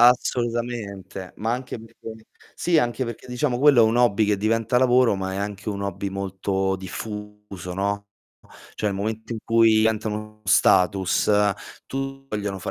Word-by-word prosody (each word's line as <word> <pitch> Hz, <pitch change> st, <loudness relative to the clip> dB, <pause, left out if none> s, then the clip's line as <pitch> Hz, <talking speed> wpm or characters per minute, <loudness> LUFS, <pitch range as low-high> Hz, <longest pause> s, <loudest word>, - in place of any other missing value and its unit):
Assolutamente, 120 Hz, -6 st, +1 dB
ma 110 Hz, +2 st, -1 dB
anche 125 Hz, 0 st, -4 dB
perché 110 Hz, -1 st, -11 dB, 0.3 s
sì, 170 Hz, -2 st, +2 dB
anche 120 Hz, -1 st, 0 dB
perché, 115 Hz, 0 st, -7 dB
diciamo 125 Hz, 0 st, -1 dB
quello 140 Hz, -3 st, +6 dB
è -, -, +7 dB
un 110 Hz, +2 st, +2 dB
hobby 110 Hz, -3 st, +3 dB
che 105 Hz, -, +2 dB
diventa 115 Hz, +4 st, +1 dB
lavoro, 125 Hz, -4 st, +4 dB
ma 95 Hz, 0 st, -3 dB
è -, -, -4 dB
anche 100 Hz, +1 st, -4 dB
un 100 Hz, -1 st, -3 dB
hobby 100 Hz, 0 st, -3 dB
molto 95 Hz, 0 st, -2 dB
diffuso, 105 Hz, -1 st, -7 dB
no. 100 Hz, +1 st, -2 dB, 0.7 s
Cioè 105 Hz, -, 0 dB
il 100 Hz, -, -3 dB
momento 110 Hz, +3 st, -4 dB
in 115 Hz, -, -4 dB
cui 115 Hz, -1 st, +5 dB
diventa 110 Hz, 0 st, +1 dB
uno 105 Hz, 0 st, -5 dB
status, 95 Hz, +1 st, +3 dB, 0.6 s
tu 135 Hz, 0 st, -5 dB
vogliono 100 Hz, -4 st, -3 dB
110 Hz, 155 wpm, -24 LUFS, 100-120 Hz, 0.7 s, è